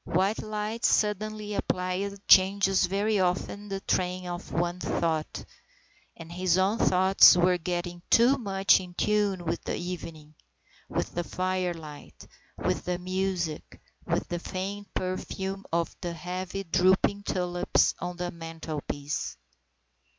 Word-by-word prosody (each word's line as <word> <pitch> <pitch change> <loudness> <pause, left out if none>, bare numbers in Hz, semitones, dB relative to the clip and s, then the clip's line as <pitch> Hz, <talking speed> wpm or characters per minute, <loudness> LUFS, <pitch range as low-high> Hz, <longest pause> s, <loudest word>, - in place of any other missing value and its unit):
White 190 +5 0
light 215 +2 -4
suddenly 210 0 +1
applied 195 +1 -2
changes 195 0 +5
very 205 +3 +1
often 190 +3 -1
the 195 0 -3
train 180 -1 -1
of 175 -1 -6
one's 175 +1 -1
thought, 160 -2 -1 0.7
and 165 0 -10
his 180 0 +1
own 195 +4 +2
thoughts 190 0 +6
were 180 0 +3
getting 175 0 -3
too 250 +4 +5
much 195 -3 +3
in 180 -1 -10
tune 205 -4 +1
with 165 +1 -2
the - - -2
evening, 165 -4 -7 0.6
with - - -2
the 175 - -2
firelight, 175 -5 -4 0.3
with - - -1
the 180 0 -1
music, 185 -3 -3 0.3
with - - 0
the 175 - -3
faint 195 +3 -5
perfume 190 +1 -3
of 170 0 -1
the 175 -2 -3
heavy 180 +3 -5
drooping 190 +3 +2
tulips 180 -2 +1
on 180 0 -5
the 175 0 -3
mantelpiece. 160 -3 -5
185 Hz, 130 wpm, -28 LUFS, 175-195 Hz, 0.7 s, thoughts